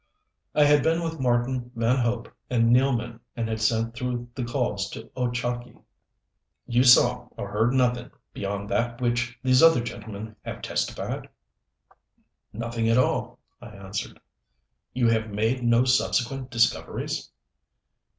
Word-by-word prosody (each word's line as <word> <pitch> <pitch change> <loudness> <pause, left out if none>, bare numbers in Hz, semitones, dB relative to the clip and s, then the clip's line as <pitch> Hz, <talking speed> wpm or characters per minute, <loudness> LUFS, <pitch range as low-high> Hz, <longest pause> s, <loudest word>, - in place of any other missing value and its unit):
I 150 - +6
had 145 0 +5
been 165 +3 +1
with 165 -1 -4
Marten, 125 0 0
Van 115 +3 +2
Hope 120 -1 -1 0.2
and 115 -1 +4
Nealman 125 -3 +1 0.2
and 115 -2 -2
had 110 -1 -3
sent 115 +1 +1
through 120 +1 -4
the 125 - -4
calls 120 -5 -1
to 110 +2 -9
Ochakee. 120 -1 -3 0.9
"You 120 +1 +2
saw 125 -1 +5
or 100 - -5
heard 110 +4 +2
nothing 125 -2 +1 0.2
beyond 100 0 -4
that 120 0 0
which 120 0 -1
these 130 -1 +4
other 165 -7 +6
gentlemen 110 -2 -7
have - - -7
testified?" - - -3 1.2
"Nothing 115 0 -2
at 115 - +4
all," 130 - +1 0.2
I 120 - -9
answered. 100 +1 -6 0.7
"You 125 -2 +1
have 110 -1 +1
made 110 +5 0
no 120 +1 +4
subsequent 130 0 +1
discoveries?" 115 -2 0
120 Hz, 135 wpm, -25 LUFS, 115-125 Hz, 1.2 s, I